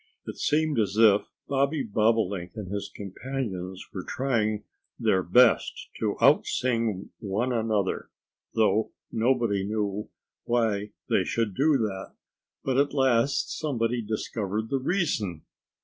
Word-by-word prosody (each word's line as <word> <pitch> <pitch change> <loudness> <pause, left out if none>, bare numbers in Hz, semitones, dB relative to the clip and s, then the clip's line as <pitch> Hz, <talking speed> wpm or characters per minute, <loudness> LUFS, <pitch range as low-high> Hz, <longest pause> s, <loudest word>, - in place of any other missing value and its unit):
It - - -7
seemed 150 -3 +1
as 105 -1 0
if 105 -2 +5 0.2
Bobby 140 +1 +1
Bobolink 105 -4 +1
and 100 -4 -6
his 100 0 -3
companions 95 -3 -5
were 95 - -4
trying 110 -5 0 0.4
their 95 - +3
best 115 +7 +3
to - - 0
out - - +5
sing 115 -6 -1
one 115 +4 -1
another, 110 -4 0 0.5
though 110 -1 +2 0.2
nobody 115 -4 +1
knew 105 0 -2 0.4
why 110 -4 +1 0.2
they - - +3
should 115 -4 -1
do 145 +6 +3
that. 100 -5 -3 0.5
But 130 -1 0
at 140 +1 +1
last 130 -1 +2
somebody 120 -5 0
discovered 110 0 -3
the 135 - +1
reason. 130 - -1
110 Hz, 125 wpm, -27 LUFS, 100-130 Hz, 0.5 s, if